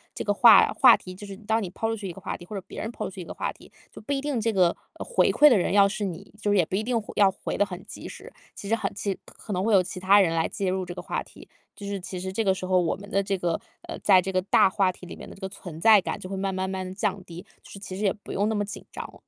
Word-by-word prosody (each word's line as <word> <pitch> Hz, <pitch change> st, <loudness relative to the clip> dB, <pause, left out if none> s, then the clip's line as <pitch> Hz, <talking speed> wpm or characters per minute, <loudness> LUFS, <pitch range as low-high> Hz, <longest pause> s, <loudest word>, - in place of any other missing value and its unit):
这 -, -, -4 dB
个 205 Hz, -, +1 dB
话 220 Hz, -1 st, +8 dB
话 250 Hz, -3 st, +9 dB
题 185 Hz, -, -9 dB
就 205 Hz, +3 st, -10 dB
是 195 Hz, -, -8 dB
当 220 Hz, +2 st, -1 dB
你 185 Hz, -, -4 dB
抛 225 Hz, -, -3 dB
出 225 Hz, -, -1 dB
去 200 Hz, -3 st, -6 dB
一 175 Hz, -, -6 dB
个 195 Hz, -, -12 dB
话 -, -, -4 dB
题， 175 Hz, -, -12 dB
或 210 Hz, -, -8 dB
者 195 Hz, -, -4 dB
别 -, -, -8 dB
人 220 Hz, -, -4 dB
抛 -, -, -5 dB
出 -, -, -4 dB
去 185 Hz, -, -8 dB
一 -, -, -8 dB
个 -, -, -7 dB
话 -, -, -3 dB
题， -, -, -17 dB, 0.2 s
就 -, -, -11 dB
不 250 Hz, +6 st, -3 dB
一 275 Hz, -, -1 dB
定 285 Hz, -4 st, -1 dB
这 225 Hz, 0 st, 0 dB
个 180 Hz, -3 st, +3 dB, 0.2 s
回 485 Hz, -, +1 dB
馈 300 Hz, 0 st, +7 dB
的 240 Hz, -, +5 dB
人 185 Hz, -, 0 dB
要 200 Hz, -1 st, +6 dB
是 205 Hz, +1 st, -3 dB
你。 190 Hz, +1 st, -7 dB
就 205 Hz, -, +1 dB
是 205 Hz, -, +3 dB
也 175 Hz, -, +4 dB
不 185 Hz, -, -4 dB
一 215 Hz, -, 0 dB
定 235 Hz, 0 st, 0 dB
回 210 Hz, -, -10 dB
要 200 Hz, -2 st, +5 dB
回 -, -, -5 dB
得 205 Hz, -, +3 dB
很 185 Hz, -1 st, -8 dB
及 -, -, -9 dB
时， -, -, -11 dB, 0.2 s
其 200 Hz, -, -8 dB
实 225 Hz, -, +3 dB
很 210 Hz, -3 st, -3 dB
其 200 Hz, 0 st, -3 dB
实 -, -, -4 dB
可 215 Hz, -, -11 dB
能 180 Hz, 0 st, -1 dB
会 220 Hz, 0 st, +2 dB
有 190 Hz, -, +6 dB
其 180 Hz, 0 st, -6 dB
他 195 Hz, +2 st, +5 dB
人 170 Hz, -4 st, +3 dB
来 160 Hz, -, +1 dB
介 195 Hz, -2 st, -2 dB
入 185 Hz, 0 st, -1 dB
这 175 Hz, -, -7 dB
个 -, -, -7 dB
话 -, -, -3 dB
题。 -, -, -16 dB, 0.3 s
就 200 Hz, -, -8 dB
是 200 Hz, -1 st, -3 dB
其 180 Hz, 0 st, -7 dB
实 190 Hz, +1 st, -4 dB
这 225 Hz, +4 st, -1 dB
个 195 Hz, -2 st, +3 dB
时 185 Hz, -1 st, -6 dB
候 185 Hz, 0 st, +3 dB
我 170 Hz, -2 st, 0 dB
们 200 Hz, +1 st, -12 dB
的 200 Hz, -1 st, +1 dB
这 195 Hz, 0 st, -1 dB
个， 175 Hz, -2 st, -1 dB, 0.3 s
呃， -, -, -5 dB
在 185 Hz, -, +5 dB
这 190 Hz, +1 st, -4 dB
个 185 Hz, -, +1 dB
大 190 Hz, -, +4 dB
话 190 Hz, -1 st, +2 dB
题 180 Hz, 0 st, -13 dB
里 -, -, -8 dB
面 -, -, -10 dB
的 -, -, -11 dB
这 195 Hz, -, -18 dB
个 190 Hz, -, -4 dB
存 175 Hz, -4 st, -10 dB
在 220 Hz, -2 st, +7 dB
感 -, -, -4 dB
就 185 Hz, -, -8 dB
会 195 Hz, -, -4 dB
慢 195 Hz, 0 st, -2 dB
慢 190 Hz, 0 st, -2 dB
慢 185 Hz, -1 st, -4 dB
降 200 Hz, -1 st, -2 dB
低， 170 Hz, 0 st, -10 dB, 0.2 s
就 -, -, -15 dB
是 195 Hz, -, -9 dB
其 190 Hz, -1 st, -7 dB
实 210 Hz, -, -4 dB
也 195 Hz, -, +2 dB
不 210 Hz, -, -12 dB
用 205 Hz, +2 st, 0 dB
那 220 Hz, -, 0 dB
么 205 Hz, -1 st, 0 dB
紧 205 Hz, -, -8 dB
张。 -, -, -8 dB
195 Hz, 365 characters per minute, -26 LUFS, 185-210 Hz, 0.3 s, 话